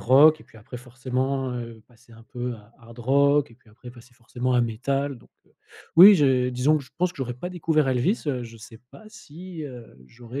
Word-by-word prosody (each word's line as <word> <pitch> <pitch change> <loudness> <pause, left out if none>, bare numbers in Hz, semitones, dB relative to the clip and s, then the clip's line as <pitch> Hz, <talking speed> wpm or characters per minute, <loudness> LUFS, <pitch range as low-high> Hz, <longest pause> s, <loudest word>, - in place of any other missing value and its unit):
rock 150 +5 +5
et - - -16
puis, 110 - -18
après, 110 +4 -11
forcément, 130 +2 -3
heu, 115 -2 -7
passer 120 -1 -23
un 115 - -16
peu, 125 0 -6
heu, 115 - -8 0.2
hard 115 +1 -16
rock 140 +3 +2
et 115 - -17
puis 115 -2 -25
après 120 +3 -13
passer 120 0 -17
forcément 125 +1 -4
à 125 - +3
métal 135 +5 -2
donc 120 - -21 0.7
oui, 195 +5 +10
je 130 -6 +2
disons 130 +5 +1
que 140 - -10
je 125 - -21
pense 180 0 +1
que - - -22
j'aurais 130 -3 -4
pas 175 +9 -7
découvert 160 -5 0
Elvis, 130 - 0
heu, 130 -4 -2
je 115 0 -12
sais 110 +1 -14
pas 220 - -15
si, 180 -5 -11
heu, 125 - -11
j'aurais 120 - -9
125 Hz, 220 wpm, -24 LUFS, 120-145 Hz, 0.7 s, oui